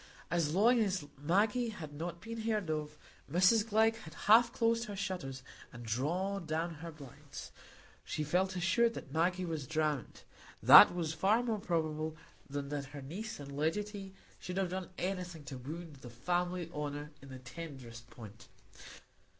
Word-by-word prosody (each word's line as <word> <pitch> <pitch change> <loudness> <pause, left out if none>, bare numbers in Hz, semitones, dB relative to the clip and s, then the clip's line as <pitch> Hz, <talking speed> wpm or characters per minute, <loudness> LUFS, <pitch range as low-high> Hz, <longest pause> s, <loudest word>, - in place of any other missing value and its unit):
As 165 -2 +1
long 235 +5 +5
as 190 -7 0 0.2
Maggie 210 +9 +2
had 155 -9 -8
not 170 +3 -5
been 230 0 -6
heard 215 -6 0
of, 150 -1 -3 0.3
Mrs 205 +6 +4
Glegg 220 +1 +4
had 160 0 -11
half 230 +3 +6
closed 230 0 +1
her 205 -1 -6
shutters 175 -10 -4 0.3
and 120 0 -9
drawn 170 - -1
down 165 +2 -1
her 170 0 -6
blinds. 145 -5 -10 0.5
She 155 - -3
felt 185 +5 +1
assured 185 +7 +2
that - - -8
Maggie 180 +3 +1
was 160 -6 -4
drowned; 155 -4 -1 0.4
that - - +10
was 165 -3 -1
far 200 +9 +3
more 225 -3 -1
probable 160 -3 -1 0.3
than 140 0 -4
that 145 -1 -3
her 140 0 -9
niece 195 +10 -6
and 140 -1 -8
legatee 195 +5 -2 0.2
should 180 +1 -5
have 190 -2 +1
done 185 -1 -4
anything 180 -4 -3
to 140 -2 -7
wound 155 +3 -7
the 125 -2 -10
family 175 +7 -1
honour 145 0 -4
in 135 - -12
the 130 - -8
tenderest 130 -3 -9
point. 110 -2 -12
170 Hz, 160 wpm, -34 LUFS, 145-195 Hz, 0.5 s, that